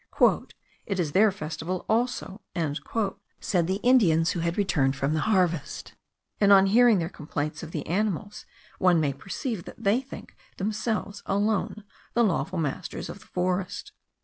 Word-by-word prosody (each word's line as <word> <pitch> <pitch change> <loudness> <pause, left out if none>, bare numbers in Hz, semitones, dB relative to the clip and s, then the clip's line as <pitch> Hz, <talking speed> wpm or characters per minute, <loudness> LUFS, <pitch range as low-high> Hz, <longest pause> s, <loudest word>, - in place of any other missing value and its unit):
"It 195 -2 -2
is 160 -5 0
their 205 +6 +5
festival 160 +1 -4
also," 225 -3 -1 1.0
said 175 -4 0
the 190 - +1
Indians 170 -11 +4
who 180 - -3
had 170 +1 -1
returned 145 -9 +2
from 135 +2 0
the 155 - +1
harvest; 180 -7 0 0.5
and 200 -1 +5
on 195 -1 +8
hearing 230 +2 +5
their 165 -2 -1
complaints 150 -2 -4
of 165 - -7
the 155 -3 -4
animals, 205 +2 -2 0.3
one 180 -3 +4
may 145 -3 +1
perceive 195 - -5
that - - -11
they 210 +6 +3
think 270 - -11 0.2
themselves 210 0 -2
alone 205 +1 0 0.3
the 235 - +4
lawful 185 -1 0
masters 165 +3 -3
of - - -8
the - - -18
forest. 180 +1 -2
185 Hz, 150 wpm, -27 LUFS, 165-210 Hz, 1.0 s, on